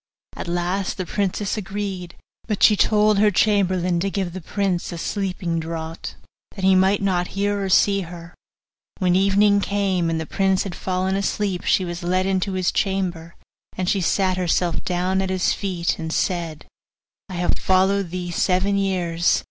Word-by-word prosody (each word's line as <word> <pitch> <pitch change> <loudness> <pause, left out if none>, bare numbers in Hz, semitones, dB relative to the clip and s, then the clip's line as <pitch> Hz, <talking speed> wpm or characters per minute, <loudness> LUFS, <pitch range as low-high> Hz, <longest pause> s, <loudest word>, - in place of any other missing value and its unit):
At - - -6
last 175 +3 -1
the 185 - -3
princess 200 +2 -1
agreed, 195 -3 -5 0.3
but 210 -3 -1
she 210 - +7
told 210 0 +3
her 210 0 +5
chamberlain 185 -3 +2
to 195 +3 0
give 190 -3 -3
the 185 - -6
prince 190 0 -2
a 170 - -5
sleeping 180 -2 -2
draught, 160 0 -6 0.4
that 195 - -7
he 190 - +6
might 190 +2 +3
not 180 -2 +1
hear 205 0 0
or 195 - -2
see 200 +1 +4
her. 170 -1 -9 0.6
When 180 -2 +2
evening 200 +2 +4
came, 195 -4 0
and 165 -1 -1
the 160 - -4
prince 190 +2 +1
had 195 - -5
fallen 185 +1 -1
asleep, 195 -2 -1
she 185 - +2
was 175 +1 -5
led 185 +2 0
into 190 0 0
his 185 -1 +1
chamber, 180 -4 -2 0.4
and 185 - -2
she 195 +1 +1
sat 185 +1 +1
herself 175 -1 0
down 185 +1 0
at 190 - -2
his 185 -1 +1
feet, 180 -4 -2
and 160 0 -4
said: 165 -4 -2 0.6
'I - - -7
have 175 0 0
followed 190 0 +2
thee 175 0 -4
seven 190 +3 +1
years. 175 -3 +1
185 Hz, 170 wpm, -22 LUFS, 175-195 Hz, 0.6 s, she